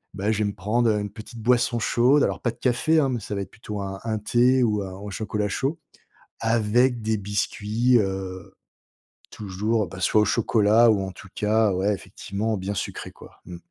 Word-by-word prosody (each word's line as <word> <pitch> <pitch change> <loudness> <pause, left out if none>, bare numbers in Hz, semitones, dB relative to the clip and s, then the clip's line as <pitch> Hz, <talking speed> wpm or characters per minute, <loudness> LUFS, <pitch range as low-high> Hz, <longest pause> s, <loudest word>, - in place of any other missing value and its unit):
Ben, 105 +2 0
je 110 - -1
vais 105 - +1
me 100 - -3
prendre 110 +4 +1
une 105 -1 -4
petite 110 +3 -11
boisson 120 +1 +2
chaude. 125 +5 +3
Alors, - - -1
pas 120 - 0
de 115 - -6
café, 125 +6 +1
hein, 140 -3 +2
mais 125 - -1
ça 105 0 -5
va 100 - -2
être 95 - -7
plutôt 105 -2 -7
un 95 0 -5
un 110 -1 -1
thé 125 +4 +3
ou 105 -3 +1
un 95 - -6
ou 105 - -8
un - - -6
chocolat 105 +1 -2
chaud 140 +10 -1 0.6
avec 115 +2 +2
des 110 0 0
biscuits, 105 +4 +1
heu 95 -2 -4 0.8
toujours, 105 +1 -1
ben 95 - -9
soit 105 +4 +3
au - - +3
chocolat 110 +1 +4
ou 105 -3 +3
en 95 - -6
tout 100 - -13
cas, 105 -1 +2
ouais, 95 +3 +1
effectivement, 105 +4 -4
bien 95 +2 -3
sucré, 95 - -5
quoi, - - -16
mmh. 90 - -8
105 Hz, 205 wpm, -24 LUFS, 100-120 Hz, 0.8 s, chocolat